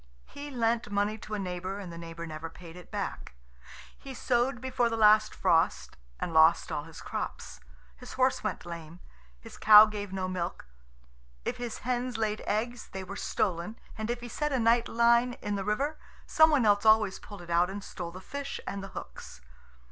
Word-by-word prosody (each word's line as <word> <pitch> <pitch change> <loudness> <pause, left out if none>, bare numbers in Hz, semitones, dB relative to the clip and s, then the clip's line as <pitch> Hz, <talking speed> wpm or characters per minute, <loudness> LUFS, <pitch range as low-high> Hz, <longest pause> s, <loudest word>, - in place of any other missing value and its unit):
He 285 +1 -9
lent 230 -4 0
money 205 +2 0
to 215 - -5
a - - -2
neighbour, 185 0 -4
and 185 -4 -7
the - - -8
neighbour 170 0 -7
never 160 0 -6
paid 165 0 -12
it 180 -1 -12
back. - - -5 0.6
He 270 -1 -10
sowed 245 +1 +1
before 250 -2 0
the 225 - -2
last 215 0 +5
frost, 165 0 +1 0.2
and 170 - -3
lost 160 +1 +5
all 145 - -3
his 165 -1 -11
crops. - - -5 0.4
His - - -10
horse 260 0 +1
went - - -3
lame. 170 0 -8 0.4
His - - -12
cow 210 0 +10
gave 205 -2 -5
no 190 -1 -2
milk. 180 - -4 0.8
If - - -2
his 240 -2 -5
hens 250 -1 -1
laid 215 -1 -1
eggs, 230 +3 -2
they 190 0 -5
were 195 +2 -7
stolen; 190 +1 -2 0.2
and 220 +1 -4
if 240 0 -2
he 240 - -6
set 295 +5 -2
a 265 - +1
night 235 0 +3
line 235 +1 +3
in 205 -3 -4
the 200 -1 -2
river, 275 +10 -1 0.3
some 315 -2 +5
one 285 -7 +3
else 205 -1 +4
always 215 -3 +4
pulled 205 -4 -11
it 170 - -9
out 175 +2 +3
and 200 +1 -6
stole 175 -4 -6
the 185 +2 -10
fish 280 +7 -5
and 200 0 -5
the - - -6
hooks. - - -9
210 Hz, 195 wpm, -29 LUFS, 180-240 Hz, 0.8 s, cow